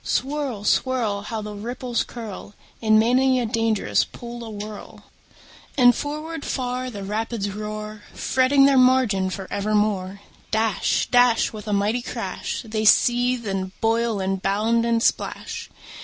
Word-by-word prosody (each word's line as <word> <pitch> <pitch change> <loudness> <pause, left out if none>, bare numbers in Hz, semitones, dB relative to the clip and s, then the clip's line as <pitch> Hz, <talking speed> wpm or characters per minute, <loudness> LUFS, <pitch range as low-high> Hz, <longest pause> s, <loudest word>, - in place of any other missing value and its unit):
Swirl, 270 -6 -2
swirl! 225 -3 +1
How 220 +1 -5
the 210 0 -6
ripples 240 +3 -3
curl 210 -3 -9 0.3
In 215 -1 +4
many 255 +3 +3
a 245 - 0
dangerous 225 -2 +1
pool 240 0 -9
awhirl! 210 -1 -8 0.7
And 245 -2 +7
forward 300 +4 -5
far 255 0 -2
the 205 -5 -7
rapids 210 0 -3
roar, 215 +1 -6
Fretting 270 +1 +3
their 275 -1 +5
margin 250 -7 +3
for 190 0 -6
evermore. 200 -2 0 0.3
Dash, 220 -2 +1
dash, 245 -2 +4
With 215 0 -9
a - - -2
mighty 210 +4 +1
crash, 240 - -4
They 215 -1 -2
seethe, 245 +2 +3
and 190 -1 -4
boil, 225 -1 +1
and 190 0 -2
bound, 220 +4 +1
and 230 0 +1
splash. - - -2
225 Hz, 140 wpm, -23 LUFS, 210-245 Hz, 0.7 s, And